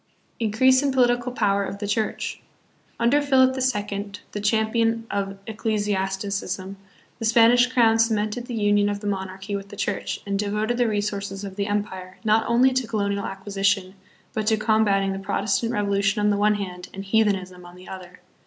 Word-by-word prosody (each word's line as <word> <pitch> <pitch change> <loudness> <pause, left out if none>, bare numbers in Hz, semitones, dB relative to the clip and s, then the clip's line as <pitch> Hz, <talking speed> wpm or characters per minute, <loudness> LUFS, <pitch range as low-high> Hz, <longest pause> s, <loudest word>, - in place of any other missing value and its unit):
Increase 255 +4 +4
in 285 -1 +1
Political 245 -1 +2
Power 200 -4 +1
of 200 - -5
the 205 0 -4
Church. 215 +1 -2 0.6
Under 240 +5 +3
Philip 260 -2 +4
the 260 - -3
Second, 205 -4 -2
the 205 - -4
champion 225 +2 +1
of 195 -1 -2
ecclesiasticism, 200 -3 -2 0.4
the 225 - -3
Spanish 235 +2 +5
crown 230 -3 +3
cemented 225 +1 0
the 245 - -4
union 205 -1 +2
of 205 0 -3
the - - -8
monarchy 195 0 -3
with 200 0 -6
the 205 - -9
church 200 0 -3
and 200 -1 -2
devoted 210 +3 -1
the 245 -1 +2
resources 205 -2 -3
of 195 -1 -7
the 200 0 -2
empire, 190 -3 -3
not 220 0 +2
only 250 +3 +4
to 255 -2 0
colonial 200 -2 -1
acquisition, 195 -1 -1 0.4
but 215 -1 -2
to 220 -1 +3
combating 205 -3 +2
the 195 - -5
Pro 195 - -3
testant 215 +3 0
revolution 200 -1 +1
on 210 0 +3
the - - +2
one 210 +1 +3
hand 180 -3 -6
and 195 +1 -6
heathenism 195 -4 0
on 175 0 -13
the 180 +1 -14
other. 180 -1 -10
205 Hz, 180 wpm, -24 LUFS, 195-225 Hz, 0.6 s, Spanish